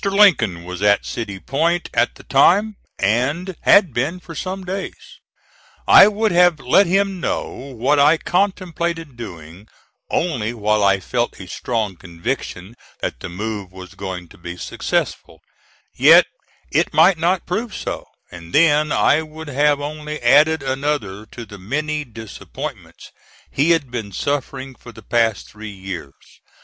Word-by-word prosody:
Lincoln 190 - +3
was 90 +1 -7
at 100 0 +3
City 100 -5 -5
Point 170 - 0
at - - +1
the - - -15
time, 215 +1 +3 0.2
and 140 - 0
had 185 - +5
been 145 +10 -1
for 170 -2 -11
some 185 +4 -5
days. 190 +2 -7 0.7
I 195 - +9
would 215 +1 0
have 175 -3 +4
let 135 +10 +4
him 195 +1 +1
know - - -1
what 135 +2 -1
I 150 +3 +5
contemplated 170 -5 -2
doing, 90 -3 -10 0.4
only 120 -9 -1
while 105 -1 +1
I 100 -1 +4
felt 120 +4 -2
a 95 - -8
strong 105 -1 -3
conviction 90 +2 -5 0.3
that - - -3
the - - -7
move 100 +1 -5
was 95 -1 -11
going 95 -3 -6
to - - -17
be 85 0 -7
successful, - - -3 0.5
yet - - +7 0.5
it - - +1
might 165 +2 +5
not 175 +2 +1
prove 215 +4 -3
so; - - -5 0.2
and 85 -1 -11
then 150 -1 +4
I 155 - +3
would 155 0 -9
have 145 +1 +2
only 150 +1 -5
added 150 +5 +4
another 130 -7 -2
to 120 +1 -9
the 105 -1 -12
many 150 +9 -2
disappointments 110 -3 -9 0.4
he 145 +4 +1
had 160 -7 +2
been 110 -5 -5
suffering 135 +3 -3
for 120 - -13
the 110 -1 -14
past 115 -1 0
three 110 0 -9
years. 95 -8 -9
135 Hz, 150 wpm, -20 LUFS, 105-165 Hz, 0.7 s, I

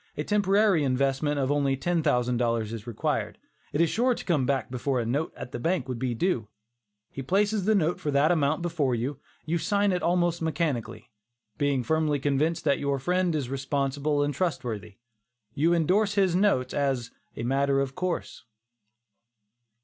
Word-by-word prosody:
A 150 - -1
temporary 200 -3 +3
investment 135 +2 0
of 135 0 0
only 140 -2 +1
$10,000 125 -8 0
is 115 0 -7
required. 115 - -2 0.3
It 150 - +1
is 170 - +3
sure 245 +2 +2
to - - -8
come 150 -8 +1
back 135 -2 -1
before 130 +1 -1
a 115 - -1
note 140 +7 -1
at 125 - -7
the - - -5
bank 165 -1 0
would 125 -2 -4
be 125 -1 -1
due. 125 - 0 0.6
He 135 - -6
places 200 +7 +1
a 220 - +4
note 175 -2 +1
for 150 - -3
that 145 +3 +3
amount 155 0 +1
before 155 -7 0
you. 130 +4 -3 0.3
You 165 +2 0
sign 205 +2 +1
it 180 -1 0
almost 175 -1 +1
mechanically. 135 -8 -2 0.5
Being 140 -3 +1
firmly 155 +1 +1
convinced 145 +4 0
that 140 -2 +2
your 140 -1 0
friend 180 +4 0
is 140 -5 -2
responsible 140 +2 -1
and 145 0 -1
trustworthy, 115 - -3 0.6
you 160 +4 +2
indorse 190 +5 +2
his 190 -4 +3
notes 185 -10 +2
as 135 -4 -1 0.3
"a 115 - -3
matter 135 +2 +1
of 135 -1 -1
course." 180 +2 -4
145 Hz, 170 wpm, -27 LUFS, 130-175 Hz, 0.6 s, a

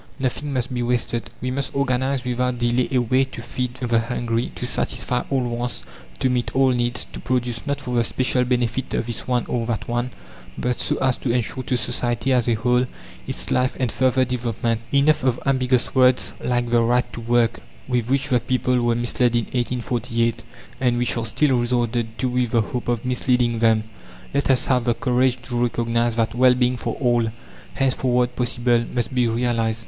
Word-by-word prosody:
Nothing 140 +2 -2
must 130 -1 -2
be 120 - -1
wasted. 120 -1 -1
We 125 +1 -2
must 135 +1 -3
organize 130 -1 0
without 125 0 0
delay 120 +1 +1
a 130 - +2
way 130 +2 +3
to 130 -3 -9
feed 125 +1 -4
the 120 -2 +1
hungry, 115 0 -2
to - - -4
satisfy 125 0 -1
all 135 -2 +1
wants, 120 0 -3 0.3
to - - +1
meet 125 -1 -1
all 135 0 +4
needs, 120 -1 0
to - - -6
produce 125 0 -2
not 140 0 -1
for 125 -3 -5
the 120 -1 +3
special 125 +2 +1
benefit 125 0 -1
of - - -1
this 120 -1 -4
one 125 -1 +1
or 115 -2 -2
that 115 -3 -2
one, 120 +1 -1 0.5
but 125 -1 -1
so - - 0
as 130 -1 +1
to 125 - -2
ensure 125 +2 -1
to 125 - 0
society 120 +1 -1
as 125 -2 +2
a 115 - +3
whole 125 +3 +2 0.4
its - - -3
life 125 0 +1
and 125 -3 0
further 130 0 +2
development. 115 -2 -2
Enough 140 +1 +3
of 125 -2 +1
ambiguous 130 -2 +1
words 130 -1 +3
like 120 -1 0
"the 120 -1 +4
right 120 +2 +2
to 120 - -6
work," 120 0 +2 0.3
with 125 -2 0
which 140 +2 +1
the 125 -2 +3
people 125 +1 0
were 120 -1 +2
misled 120 0 +1
in 120 -2 +1
1848, 120 -1 -1 0.4
and 125 -2 +2
which 120 0 0
are 115 -1 -2
still 130 +1 +2
resorted 120 -2 -1
to 130 - 0
with 125 -1 0
the 115 0 +3
hope 125 +3 -4
of 120 0 -1
misleading 125 -2 +1
them. 110 -1 +3 0.5
Let 140 - 0
us 130 -2 +3
have 125 -2 +1
the 120 -2 +2
courage 125 0 +1
to 120 0 -2
recognise 115 -1 +1
that 115 -1 0
Well 125 +1 +5
being 125 0 +1
for - - -3
all, 120 -3 +1 0.4
henceforward 125 -2 +1
possible, 120 -1 +2
must 125 +2 -1
be 125 -2 +2
realized. 115 -1 0
125 Hz, 195 wpm, -22 LUFS, 120-125 Hz, 0.5 s, Well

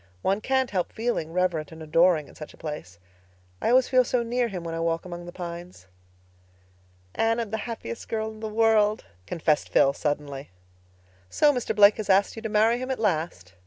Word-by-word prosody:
"One 195 +2 +1
can't 265 +1 0
help 185 -3 -1
feeling 225 -8 -2
reverent 170 -4 -1
and 160 0 -10
adoring 165 -1 +3
in - - -16
such 155 - -10
a - - -26
place. 150 - -7 0.6
I - - +1
always 255 +1 +5
feel 255 -1 +4
so 245 0 0
near 240 +1 0
Him 185 -6 -6
when 165 -1 -5
I 165 - -3
walk 165 +1 -1
among 175 -1 -8
the - - -7
pines." 175 - -8 1.3
"Anne, 225 +1 +1
I'm 225 -3 -3
the 220 - -1
happiest 115 - -6
girl 220 0 -2
in 215 - -12
the 220 0 -4
world," 215 -1 +2 0.2
confessed 155 -3 0
Phil 140 - +4
suddenly. 145 -2 -3 0.8
"So 295 - +4
Mr. 250 -4 -2
Blake 205 0 +7
has 210 -2 -5
asked 195 +1 +3
you 225 - -7
to 220 - -4
marry 220 +3 +3
him 255 +1 -5
at 265 - -1
last?" 160 - -2
190 Hz, 200 wpm, -26 LUFS, 165-225 Hz, 1.3 s, Blake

